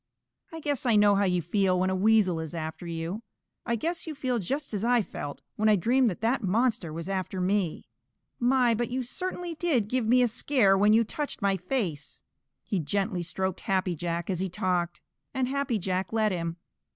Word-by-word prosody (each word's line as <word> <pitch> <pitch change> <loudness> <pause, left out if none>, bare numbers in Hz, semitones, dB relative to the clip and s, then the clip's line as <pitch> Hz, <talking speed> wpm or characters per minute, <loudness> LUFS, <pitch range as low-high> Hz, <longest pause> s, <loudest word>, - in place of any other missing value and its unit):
I 325 0 -7
guess 285 -4 -1
I 230 - +4
know 205 -1 +6
how 200 0 +3
you 180 -2 +1
feel 185 +1 +2
when 185 +1 +1
a - - 0
Weasel 195 -3 +3
is 160 +1 -6
after 160 +1 -5
you. 170 +5 -4 0.5
I 235 - +1
guess 335 +9 -3
you 310 - -4
feel 255 -4 -1
just 275 - -3
as 205 0 -2
I 240 -1 +3
felt 145 -6 -7
when 215 +1 +3
I 210 - +6
dreamed 240 +6 +3
that 185 - -6
that 235 +3 +1
monster 215 -2 +1
was 165 +2 -5
after 190 -1 -2
me. 185 -2 0 0.5
My, 245 -1 +3
but 235 +1 -1
you 255 +1 -2
certainly 355 +5 -4
did 295 -10 +1
give 250 0 0
me 250 +2 +5
a - - +4
scare 230 -3 +3
when 205 +2 +4
you 225 +2 +5
touched 285 +2 -5
my 200 -1 +3
face!" 185 - -3 0.4
He 200 - -1
gently 195 +3 -1
stroked 185 +1 -2
Happy 185 -2 0
Jack 170 +1 -3
as 180 - -2
he 190 0 -1
talked, 175 -1 -1 0.3
and 260 -1 +1
Happy 275 -3 0
Jack 185 -1 -2
let 220 -1 +2
him. 170 -2 -3
205 Hz, 200 wpm, -28 LUFS, 180-245 Hz, 0.5 s, know